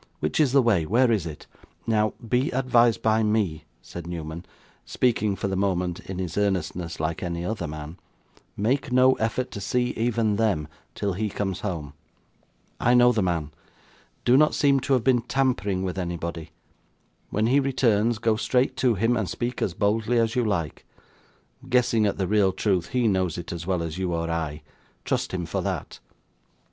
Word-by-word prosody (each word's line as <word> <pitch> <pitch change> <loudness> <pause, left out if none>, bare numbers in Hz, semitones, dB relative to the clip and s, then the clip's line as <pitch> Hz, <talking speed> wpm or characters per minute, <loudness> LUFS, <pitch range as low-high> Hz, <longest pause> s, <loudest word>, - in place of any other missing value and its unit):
Which 75 - -1
is 145 -5 +4
the 135 -1 +5
way? 105 -8 +3
Where 120 +9 +3
is 100 -7 0
it?' 75 -2 -9 0.4
'Now, 110 -1 +1
be 125 +5 +1
advised 120 -4 +2
by 110 0 +3
me,' 105 -8 0 0.2
said 85 -1 -8
Newman, 85 0 -6 0.4
speaking 110 -5 0
for 100 - -3
the 95 - -2
moment, 90 -2 0
in 95 - -7
his 90 0 -3
earnestness, 90 -4 -2
like 80 +1 -2
any 85 -1 -3
other 105 -5 -3
man 75 +2 -8 0.6
'make 125 +6 0
no 130 +1 +5
effort 115 +3 -1
to 100 - -6
see 125 +5 0
even 115 -3 0
them, 100 -10 +1 0.3
till 100 -2 -1
he 105 +3 -2
comes 95 -2 -3
home. 80 -8 -4 0.9
I 120 +1 +3
know 125 0 +6
the 110 -3 0
man. 85 -5 -1 0.7
Do 125 +1 +5
not 150 +1 +4
seem 140 -2 +3
to 135 +1 0
have 125 -4 +2
been 125 -1 +3
tampering 120 -7 0
with 95 0 -3
anybody. 85 -2 -4 0.8
When 105 +2 0
he 130 +5 +4
returns, 120 -5 +2
go 110 0 +1
straight 125 +3 +1
to 125 -4 +2
him, 115 +5 +2
and 110 -6 -1
speak 120 +1 -3
as 90 - -1
boldly 110 +4 +1
as 115 +1 +1
you 125 - +2
like. 95 -8 -2 0.9
Guessing 120 -4 +3
at 100 - -2
the 95 - 0
real 100 0 +3
truth, 95 -2 0
he 125 -2 +1
knows 95 -5 0
it 85 - -6
as 85 0 -7
well 90 -3 0
as 80 +2 -5
you 90 -2 -1
or 85 0 -2
I. 80 -2 -3 0.4
Trust - - -1
him 90 -2 -3
for - - -2
that. - - -4
105 Hz, 180 wpm, -25 LUFS, 85-120 Hz, 0.9 s, know